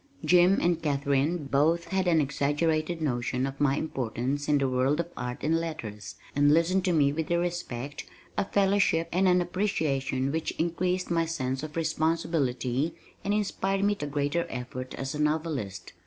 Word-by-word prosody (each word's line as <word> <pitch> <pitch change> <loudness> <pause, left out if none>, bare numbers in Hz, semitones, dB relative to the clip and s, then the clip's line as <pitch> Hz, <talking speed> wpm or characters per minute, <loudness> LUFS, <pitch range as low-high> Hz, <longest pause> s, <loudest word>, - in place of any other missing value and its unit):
Jim 180 +2 +5
and 170 -1 +1
Katharine 145 +2 0
both 155 +5 +2
had 190 -1 0
an 165 -2 +4
exaggerated 155 +3 0
notion 125 -1 0
of 135 0 -5
my 140 -1 +3
importance 135 0 -2
in 150 - +4
the 135 -1 +1
world 130 +4 +1
of 170 0 -2
art 125 0 -4
and 160 +3 +2
letters, 120 -11 -6 0.2
and 145 +1 +5
listened 170 +4 +3
to 185 - +2
me 145 -4 +3
with 160 +1 -3
a 170 - +2
respect, 150 -6 -3 0.3
a - - +1
fellowship 195 -4 +2
and 185 +2 +3
an 180 0 +4
appreciation 140 -8 -1
which 160 +1 -2
increased 180 +2 -1
my 165 -1 +2
sense 130 -5 -2
of 155 0 -7
responsibility 155 -3 0 0.3
and 200 - -1
inspired 195 -1 0
me 205 0 +3
to 150 -8 -5
greater 145 +4 -1
effort 130 +1 -6
as 135 0 -4
a 150 - -5
novelist. 150 - -2
155 Hz, 170 wpm, -28 LUFS, 135-170 Hz, 0.3 s, Jim